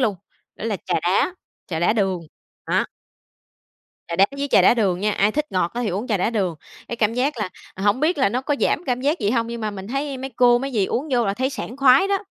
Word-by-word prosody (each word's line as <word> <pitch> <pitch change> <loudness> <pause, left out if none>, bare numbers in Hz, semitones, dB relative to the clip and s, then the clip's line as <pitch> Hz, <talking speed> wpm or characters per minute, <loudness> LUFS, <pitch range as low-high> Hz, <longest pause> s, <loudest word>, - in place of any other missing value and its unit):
luôn. 215 -6 +1 0.4
Đó - - -7
là 220 -3 -1
trà 180 - 0
đá, 195 - +1 0.3
trà 165 - -3
đá 175 +5 +3
đường, 195 -5 0 0.5
đó. - - +2 1.2
Trà 170 - -4
đá 195 +2 +6
với 285 0 -2
trà - - +6
đá - - +6
đường 190 -6 +1
nha, 210 +1 +1
ai 205 +2 +2
thích 300 +3 -2
ngọt 180 -2 +1
thì 240 -1 -1
á - - -1
uống 205 +7 -3
trà 215 - +1
đá 190 +4 0
đường. 195 -7 -1 0.3
Cái 235 - -4
cảm 225 0 +1
giác 260 +2 0
là 210 -4 -2 0.3
hổng 205 +5 +1
biết 315 +2 +1
là 265 - +4
nó 240 +5 -1
có 290 - 0
giảm 345 - +1
cảm 250 -1 0
giác 290 +6 +1
gì 205 - +1
hông 230 -1 +1
nhưng 235 0 -6
mà 215 - -2
mình 195 -1 -8
thấy 275 +2 -2
mấy 265 +1 -5
cô, 245 -1 +5
mấy 270 +1 -4
dì 205 -4 +1
uống 285 +5 -2
vô 240 -3 +2
là 195 - 0
thấy 260 +3 -1
sảng 255 -3 -6
khoái 275 +6 +5
đó. 400 0 +2
230 Hz, 265 wpm, -22 LUFS, 200-265 Hz, 1.2 s, đá